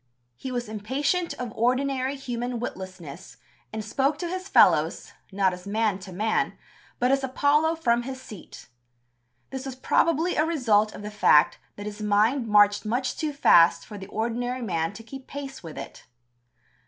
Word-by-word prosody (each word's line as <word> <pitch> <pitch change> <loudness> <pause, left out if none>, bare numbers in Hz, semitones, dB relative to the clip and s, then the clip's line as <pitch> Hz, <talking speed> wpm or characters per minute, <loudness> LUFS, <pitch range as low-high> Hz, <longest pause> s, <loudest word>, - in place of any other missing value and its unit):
He 260 - -7
was 245 -2 -3
impatient 270 - -1
of 245 -3 -6
ordinary 260 +3 0
human 245 -2 -4
witlessness, 185 - -8 0.3
and 215 -1 -5
spoke 270 +7 0
to 345 - -4
his 370 +2 -5
fellows, - - +3 0.2
not 190 -1 +1
as 180 +2 -10
man 210 -1 0
to 190 0 -10
man, 215 +5 -1 0.4
but 250 +1 +2
as 275 0 +2
Apollo 290 +5 +2
from 240 -7 +1
his 260 +1 -6
seat. 215 -8 -12 0.8
This 265 -1 -5
was 265 - -6
probably 330 +6 +1
a 305 - +4
result 230 -10 +2
of - - -9
the 210 - -6
fact 155 -7 +4 0.2
that 205 - -8
his 210 0 -7
mind 215 +5 +2
marched 205 -1 +4
much 250 +4 -1
too 310 -2 -2
fast 170 - +5
for 210 -2 -9
the 190 - -9
ordinary 240 +4 -3
man 165 -5 -1
to 225 +3 -11
keep 265 +3 -10
pace 275 -1 -7
with 165 -3 -10
it. - - -9
240 Hz, 165 wpm, -25 LUFS, 205-270 Hz, 0.8 s, fast